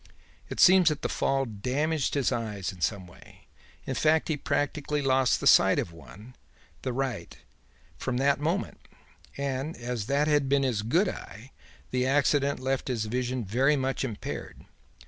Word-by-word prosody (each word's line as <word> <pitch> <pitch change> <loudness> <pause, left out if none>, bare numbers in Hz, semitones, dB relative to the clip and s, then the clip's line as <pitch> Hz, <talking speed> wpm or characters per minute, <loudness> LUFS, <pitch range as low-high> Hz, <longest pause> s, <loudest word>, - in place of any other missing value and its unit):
It - - -6
seems 185 -2 +7
that 150 - -4
the - - +1
fall 135 0 0
damaged 135 +9 -1
his 140 -3 +1
eyes 105 -5 -3
in 90 - -15
some 100 0 -1
way; 85 - -17 0.4
in - - -3
fact 160 +1 +2
he 155 - +1
practically 145 +1 -1
lost 130 -1 +2
the - - -5
sight - - +6
of - - -2
one 105 +8 -14 0.5
the 130 - -3
right 130 -2 -4 0.6
from 125 - -2
that 140 +2 +2
moment; 165 +7 -2 0.6
and, 140 +3 -3
as 120 -3 -4
that 140 +2 +1
had 145 -3 +2
been 140 0 +3
his 120 -6 0
good 165 - +2
eye, 120 - -8 0.4
the 125 0 0
accident 140 0 +2
left 135 0 -2
his 120 -4 -1
vision 125 +1 -2
very 130 +9 +2
much 135 -1 -1
impaired. 115 -6 -6
135 Hz, 165 wpm, -27 LUFS, 120-145 Hz, 0.6 s, seems